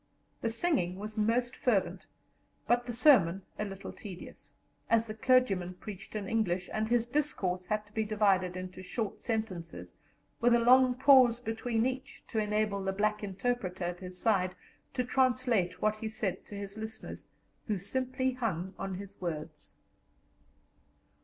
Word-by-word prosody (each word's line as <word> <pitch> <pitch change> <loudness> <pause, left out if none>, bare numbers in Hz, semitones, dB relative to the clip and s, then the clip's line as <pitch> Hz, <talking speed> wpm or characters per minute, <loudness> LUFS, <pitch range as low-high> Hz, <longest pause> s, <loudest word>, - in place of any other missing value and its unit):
The 230 - 0
singing 230 - +1
was 210 +2 -6
most 235 +3 +1
fervent, 225 -8 0 0.6
but 240 +1 +2
the - - -2
sermon 210 - +5 0.2
a 210 - 0
little 195 0 -7
tedious, 190 -4 -10 0.4
as 230 0 +4
the 215 - -5
clergyman 215 -6 +2
preached 200 +1 -9
in 205 -2 -3
English, 190 -5 0
and 215 0 0
his 235 0 +2
discourse 200 -10 -1
had 215 0 -1
to 205 - -23
be 220 - 0
divided 195 -4 +2
into 185 0 -7
short 200 +3 -4
sentences, 175 - -4 0.5
with 240 0 +5
a - - +4
long 250 +1 +6
pause 255 -3 +6
between 225 0 -1
each, 260 +2 -4
to 225 - 0
enable 210 -1 0
the 195 - 0
black 210 +2 0
interpreter 195 -2 -2
at 175 0 -3
his 180 -1 -7
side 185 -2 +1 0.4
to 250 - +1
translate 245 -8 +1
what 215 0 +2
he 220 - -4
said 215 -4 -2
to 205 - -9
his 200 +1 -6
listeners, 220 0 -7 0.4
who 210 -3 0
simply 255 +6 -1
hung 195 -7 -3
on 195 -1 -3
his 200 +1 -9
words. 155 -3 -5
215 Hz, 155 wpm, -31 LUFS, 185-240 Hz, 0.6 s, long